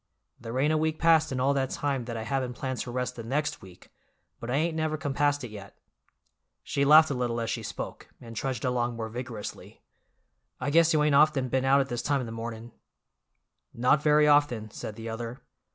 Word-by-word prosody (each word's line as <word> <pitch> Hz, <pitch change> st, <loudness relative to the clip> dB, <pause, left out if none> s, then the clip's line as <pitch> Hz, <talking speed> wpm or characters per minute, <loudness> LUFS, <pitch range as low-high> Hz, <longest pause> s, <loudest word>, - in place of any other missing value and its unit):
There 115 Hz, +1 st, -5 dB
ain't 150 Hz, +4 st, +2 dB
a 155 Hz, -, +2 dB
week 155 Hz, 0 st, 0 dB
passed 160 Hz, -2 st, +4 dB
in 130 Hz, -, -2 dB
all 135 Hz, +2 st, +2 dB
that 135 Hz, -2 st, 0 dB
time 140 Hz, -4 st, -2 dB
that 115 Hz, -1 st, -5 dB
I 110 Hz, -, -4 dB
haven't 130 Hz, 0 st, -2 dB
planned 130 Hz, 0 st, -4 dB
to -, -, -4 dB
rest 125 Hz, 0 st, -3 dB
the 115 Hz, -, -6 dB
next 150 Hz, +6 st, -2 dB
week, 90 Hz, -2 st, -15 dB, 0.5 s
but 120 Hz, -, -7 dB
I 125 Hz, -, 0 dB
ain't 160 Hz, +3 st, 0 dB
never 155 Hz, -1 st, -1 dB
compassed 145 Hz, -1 st, 0 dB
it 120 Hz, -, -7 dB
yet." 100 Hz, -2 st, -11 dB, 0.9 s
She 140 Hz, -, -1 dB
laughed 155 Hz, +2 st, +7 dB
a -, -, +1 dB
little 120 Hz, -2 st, -1 dB
as 115 Hz, -, -2 dB
she -, -, -3 dB
spoke, -, -, -7 dB
and 115 Hz, -1 st, -11 dB
trudged 130 Hz, 0 st, -3 dB
along 120 Hz, -1 st, 0 dB
more 110 Hz, -1 st, -4 dB
vigorously. 115 Hz, -2 st, -8 dB, 0.8 s
"I 130 Hz, +3 st, -2 dB
guess 165 Hz, +1 st, +5 dB
you 155 Hz, -1 st, +3 dB
ain't 150 Hz, -1 st, +2 dB
often 140 Hz, -3 st, +4 dB
been 130 Hz, +1 st, 0 dB
out 135 Hz, +1 st, +5 dB
at 135 Hz, -, -3 dB
this 120 Hz, -1 st, -2 dB
time 140 Hz, +2 st, 0 dB
in 125 Hz, -, -3 dB
the 115 Hz, -, -7 dB
mornin'." 115 Hz, 0 st, -6 dB, 1.0 s
"Not 125 Hz, +5 st, +3 dB
very 150 Hz, 0 st, +4 dB
often," 145 Hz, -8 st, +2 dB
said 105 Hz, -, -7 dB
the 115 Hz, +1 st, -8 dB
other. 115 Hz, +2 st, -6 dB
130 Hz, 215 wpm, -28 LUFS, 115-145 Hz, 1.0 s, laughed